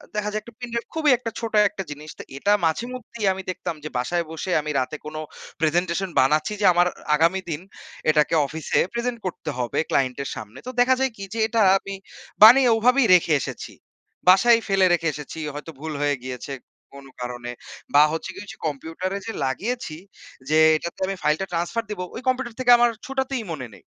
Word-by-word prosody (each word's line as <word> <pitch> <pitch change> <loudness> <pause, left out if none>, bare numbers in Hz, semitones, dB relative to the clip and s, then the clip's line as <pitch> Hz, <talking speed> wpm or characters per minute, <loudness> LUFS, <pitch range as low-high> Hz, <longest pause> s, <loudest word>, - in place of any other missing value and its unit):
দেখা 210 0 -1
যায় 215 +1 -2
একটা 235 +3 -14
পেন 245 -1 -6
ড্রাইভ 235 0 -2
খুবই 310 -3 +3
একটা 230 -1 -5
ছোট 230 -1 -5 0.2
একটা 195 - -6
জিনিস। 150 +1 -8
তো - - -6
এটা 200 +9 +2
মাঝে 160 +8 0
মধ্যেই 235 -3 -6
আমি 190 - -6
দেখতাম 175 -2 -5
যে 155 - -5
বাসায় 170 +8 -1
বসে 160 +3 -4
আমি 150 - -4
রাতে 130 +4 -3
কোন 155 +1 -7 0.5
প্রেজেন্টেশন 175 +4 +1
বানাচ্ছি 150 +8 +2
যে - - +2
আমার 175 +1 +4 0.3
আগামী 170 +5 +2
দিন 155 +2 -3 0.5
এটাকে 150 +1 +2
অফিসে 155 +3 -1
প্রেজেন্ট 235 0 -2
করতে 175 -4 -4
হবে 120 -2 -1
ক্লায়েন্টের 135 +1 0
সামনে। 105 - -9
তো - - -3
দেখা 260 +1 +4
যায় 265 -2 +1
কি? 195 - -7
যে 225 - -4
এটা 225 0 +1 0.2
আমি 195 0 -7 0.5
বানিয়ে 250 +3 +9
ওভাবেই 250 +2 +4
রেখে 170 -2 +3
এসেছি। - - -6 0.6
বাসায় 230 +5 +6
ফেলে 195 -2 +3
রেখে 165 -2 +1
এসেছি। 150 +3 -8 0.2
হয়তো 150 +2 -7
ভুল 155 +1 -5
হয়ে 145 -1 +1
গিয়েছে 130 +2 -6 0.4
কোন 140 0 -12 0.2
কারণে 120 0 -5 0.4
বা 145 - +9
হচ্ছে 160 - -4
গিয়ে 205 - -9
যে - - -11
ঐযে - - -19
কম্পিউটারে 165 +6 -4
যে 225 - -3
লাগিয়েছি 200 - -3 0.5
যে 155 - +3 0.2
এটাতে 170 +2 -5
আমি 195 - -2
ফাইলটা 155 +5 +1
ট্রান্সফার 175 +7 -1
দিব 210 -3 -5 0.2
ওই - - -6
কম্পিউটার 255 -2 -1
থেকে 250 -1 +4
আমার 240 0 +4 0.2
ছোটাতেই 265 -2 -2
মনে 135 -6 -5
নেই। - - -15
180 Hz, 195 wpm, -23 LUFS, 150-230 Hz, 0.6 s, বানিয়ে